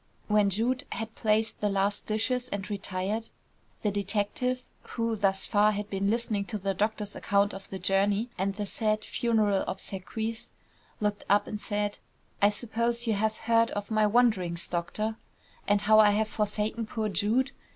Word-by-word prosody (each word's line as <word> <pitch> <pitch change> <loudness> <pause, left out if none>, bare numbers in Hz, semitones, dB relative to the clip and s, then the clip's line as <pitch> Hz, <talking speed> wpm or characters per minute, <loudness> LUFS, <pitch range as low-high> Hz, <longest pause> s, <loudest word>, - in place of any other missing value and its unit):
When 210 -1 +4
Jude 235 +6 0
had 225 -1 -5
placed 220 -1 0
the 210 - +2
last 200 +1 0
dishes 250 +4 0
and 200 -3 -4
retired, 200 +2 -2 0.5
the 210 - +2
detective, 210 +6 -1 0.2
who 230 -1 -2
thus 195 -2 +1
far 210 +1 +4
had 205 0 -4
been 195 0 0
listening 220 -2 0
to 210 - -4
the 195 0 -1
doctor's 210 +1 -1
account 200 0 +2
of 195 0 -9
the 190 - -5
journey 200 +5 +1
and 195 +1 -1
the 205 0 -3
sad 215 +1 0
funeral 215 -4 +1
obsequies, 220 +4 -4 0.5
looked 210 -1 -1
up 205 +1 +4
and 210 -1 -5
said: 205 -1 -2 0.4
"I 205 - +7
suppose 235 +2 -1
you 225 - +2
have 215 +1 0
heard 230 0 +3
of 205 +2 -5
my 215 -1 +4
wanderings, 205 -7 +2
doctor, 210 +6 -2 0.5
and 205 0 +3
how 215 +1 +6
I 210 -1 +8
have 215 +1 +1
forsaken 215 +1 -1
poor 220 -1 -2
Jude? 215 +8 +1
210 Hz, 165 wpm, -28 LUFS, 200-225 Hz, 0.5 s, I